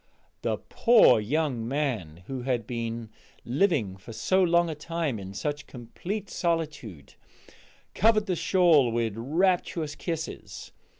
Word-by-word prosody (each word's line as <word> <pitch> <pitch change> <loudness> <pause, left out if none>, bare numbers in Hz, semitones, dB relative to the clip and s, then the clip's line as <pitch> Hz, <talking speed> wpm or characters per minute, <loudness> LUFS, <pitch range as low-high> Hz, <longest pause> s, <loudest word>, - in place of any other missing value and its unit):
The - - -1
poor 230 - +5
young 125 0 -1
man, 115 - -2
who 130 +2 -5
had 125 -3 -1
been 115 -1 -4 0.3
living 125 - +1
for 95 +4 -12
so 190 +11 +1
long 170 -1 +3
a 160 - -3
time 155 -5 -3
in 95 0 -8
such 145 +5 -3
complete 175 - -6
solitude, 155 - -3 0.8
covered 215 -1 +3
the 185 -3 -1
shawl 165 -9 +4
with 115 -2 -1
rapturous 160 +4 0
kisses. 160 0 -6
145 Hz, 125 wpm, -27 LUFS, 115-170 Hz, 0.8 s, poor